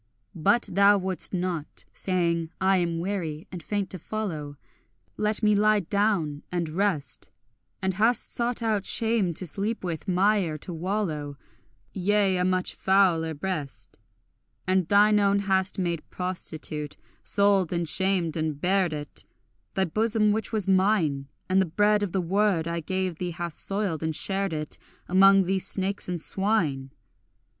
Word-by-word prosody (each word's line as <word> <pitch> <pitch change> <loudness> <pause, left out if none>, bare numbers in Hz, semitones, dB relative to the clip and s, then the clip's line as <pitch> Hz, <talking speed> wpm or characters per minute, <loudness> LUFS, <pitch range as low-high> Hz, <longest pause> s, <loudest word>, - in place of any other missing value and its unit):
But 235 +9 +2
thou 200 +2 +5
wouldst 190 -1 -2
not, 180 -4 -2
saying, 170 -3 -1
I 190 0 +3
am 170 -2 -1
weary 170 -4 -4
and 180 -2 -6
faint 200 +2 -3
to 185 - -3
follow, 160 -8 -5 0.6
Let 215 +1 -1
me 210 0 +4
lie 210 0 +3
down 175 -6 0
and 175 -3 -2
rest; 175 -3 -1 0.5
And 190 0 +1
hast 225 +5 +1
sought 240 0 -1
out 215 -3 0
shame 220 -7 +2
to 185 - -1
sleep 200 +7 -1
with, 170 +1 -4
mire 185 -3 +2
to 175 +4 -8
wallow, 160 -5 -3 0.6
Yea, 195 0 +2
a 180 - +1
much 185 0 0
fouler 175 -5 +2
breast: 155 -3 -5 0.7
And 185 -2 +1
thine 210 +2 +5
own 200 0 +3
hast 190 -1 +1
made 170 -4 -1
prostitute, 160 -5 -4 0.3
sold 200 -3 +3
and 170 -1 -1
shamed 185 -1 +2
and 155 -3 -2
bared 185 -1 +1
it, 150 -1 -2 0.5
Thy 190 - +2
bosom 215 +4 +1
which 220 +1 -2
was 215 -4 +2
mine, 185 -8 +2 0.2
And 190 +1 +3
the 190 - 0
bread 205 +5 +2
of 205 -3 -2
the 190 - 0
word 185 -1 +1
I 170 0 -2
gave 185 0 -3
thee 180 - -2
hast 170 -2 0
soiled, 195 -6 -2
and 160 -1 -1
shared 195 +2 +1
it 155 -1 -5 0.3
Among 195 +1 +6
these 190 +1 -1
snakes 195 0 -2
and 175 -1 -2
swine. 160 -9 -1
185 Hz, 150 wpm, -26 LUFS, 165-200 Hz, 0.7 s, Among